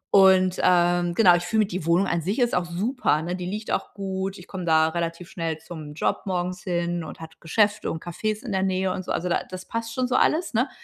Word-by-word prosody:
Und, 190 Hz, -1 st, +5 dB
ähm, 175 Hz, -1 st, +3 dB
genau 185 Hz, -4 st, +7 dB
ich 175 Hz, -, 0 dB
finde, 215 Hz, +4 st, +2 dB
die 180 Hz, -4 st, -5 dB
Wohnung 175 Hz, +4 st, +4 dB
an 170 Hz, -, 0 dB
sich 195 Hz, -, -2 dB
ist 240 Hz, -2 st, +2 dB
auch 180 Hz, -, +1 dB
super, 175 Hz, -, 0 dB
ne? 175 Hz, +1 st, -2 dB
Die 180 Hz, -1 st, -5 dB
liegt 210 Hz, +3 st, -4 dB
auch -, -, -2 dB
gut. 195 Hz, 0 st, -3 dB
Ich 180 Hz, -, -12 dB
komme 190 Hz, -2 st, -6 dB
da 160 Hz, -1 st, +4 dB
relativ 170 Hz, +1 st, -3 dB
schnell 165 Hz, -4 st, -3 dB
zum 155 Hz, -2 st, -9 dB
Job -, -, 0 dB
morgens 180 Hz, -1 st, -2 dB
hin 175 Hz, -2 st, -1 dB
und -, -, -9 dB
hat 160 Hz, 0 st, -11 dB
Geschäfte 205 Hz, +5 st, +1 dB
und 160 Hz, -, -6 dB
Cafés 215 Hz, +6 st, -3 dB
in 240 Hz, -, -5 dB
der 190 Hz, -1 st, +1 dB
Nähe 190 Hz, 0 st, 0 dB
und 185 Hz, -, -5 dB
so. -, -, -5 dB
Also, 175 Hz, -, -1 dB
da 175 Hz, -, +1 dB
das 185 Hz, 0 st, -7 dB
passt 230 Hz, 0 st, -4 dB
schon 255 Hz, -1 st, 0 dB
so 245 Hz, -, -2 dB
alles, 320 Hz, +1 st, +2 dB
ne? 250 Hz, +5 st, +1 dB
180 Hz, 245 wpm, -25 LUFS, 170-200 Hz, -, genau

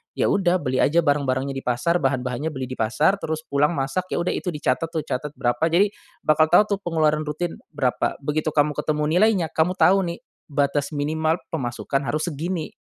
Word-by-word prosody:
ya -, -, +1 dB
udah 185 Hz, -2 st, +2 dB
beli 130 Hz, -2 st, -1 dB
aja 165 Hz, +4 st, +4 dB
barang-barangnya 140 Hz, -2 st, +1 dB
di 135 Hz, -, -4 dB
pasar 125 Hz, +8 st, +1 dB
bahan-bahannya 130 Hz, +2 st, -1 dB
beli 130 Hz, -2 st, -5 dB
di 130 Hz, -, -6 dB
pasar 150 Hz, -, +2 dB
terus 160 Hz, -3 st, -3 dB
pulang 145 Hz, +3 st, +2 dB
masak 135 Hz, +7 st, -1 dB
ya -, -, 0 dB
udah 175 Hz, -, 0 dB
itu 180 Hz, -, -3 dB
dicatet 145 Hz, 0 st, 0 dB
tuh 165 Hz, -1 st, -3 dB
catet 150 Hz, +1 st, -4 dB
berapa 120 Hz, +5 st, 0 dB
jadi 180 Hz, +5 st, +3 dB, 0.4 s
bakal 155 Hz, +1 st, +5 dB
tahu 175 Hz, +6 st, +6 dB
tuh -, -, -26 dB
pengeluaran 155 Hz, -2 st, +1 dB
rutin 165 Hz, +3 st, -3 dB, 0.2 s
berapa, 130 Hz, -4 st, 0 dB
begitu 150 Hz, +2 st, 0 dB
kamu 150 Hz, 0 st, +2 dB
ketemu 150 Hz, -1 st, -1 dB, 0.2 s
nilainya 205 Hz, -5 st, +3 dB
kamu 165 Hz, +3 st, +2 dB
tahu 195 Hz, 0 st, +5 dB
nih, -, -, -11 dB, 0.3 s
batas 145 Hz, +1 st, 0 dB
minimal 160 Hz, +3 st, 0 dB
pemasukan 135 Hz, 0 st, -2 dB
harus 155 Hz, +4 st, -1 dB
segini, 165 Hz, +2 st, -3 dB
150 Hz, 185 wpm, -23 LUFS, 135-165 Hz, 0.4 s, tahu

